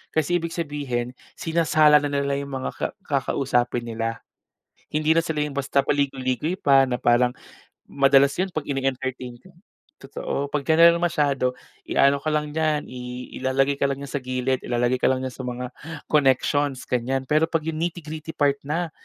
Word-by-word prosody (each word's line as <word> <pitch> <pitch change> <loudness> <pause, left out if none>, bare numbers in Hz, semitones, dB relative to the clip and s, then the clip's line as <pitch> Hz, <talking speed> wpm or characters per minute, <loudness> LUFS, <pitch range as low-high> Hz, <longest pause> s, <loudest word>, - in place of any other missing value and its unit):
Kasi 160 +3 +2
ibig 165 0 -5
sabihin, 140 -7 -3 0.2
sinasala 155 -2 +4
na 145 - -2
nila 140 -1 -1
yung 140 -1 -6
mga 130 - -3
ka - - -3 0.2
kakausapin 130 -6 0
nila. 115 0 -4 0.7
Hindi 155 +1 +2
na 165 - +3
sila 160 -3 -2
yung 140 - -9
basta 140 0 0
paligoy-ligoy 140 +3 0
pa 135 -1 +5
na 125 -2 -1
parang, 120 +1 +3 0.5
madalas 135 0 +4
yun 190 - +1
'pag 155 -5 -4
ini-entertain 130 -2 -3
ka. 185 - -17 0.4
Totoo, 475 - -4
'pag 150 - +1
general 170 +1 +6
masyado 145 -7 +1 0.3
iano 140 +1 +4
ka 155 - -4
lang 150 -1 -1
diyan, 155 -1 0
i 125 0 -7
ilalagay 135 +2 +1
ka 140 - +3
lang 140 0 -3
niya 140 - -9
sa 145 - -1
gilid. 130 0 -1
Ilalagay 120 +1 0
ka - - +3
lang 130 0 0
niya 130 - -4
sa - - -14
mga 125 0 -4 0.4
connections 140 -1 +2
ganiyan, 130 +2 0
pero 155 +2 +4
'pag 165 -2 -1
yung 160 -1 -3
nitty-gritty 160 -2 -5
part 140 -1 +2
na, 165 +3 -2
140 Hz, 170 wpm, -24 LUFS, 130-155 Hz, 0.7 s, general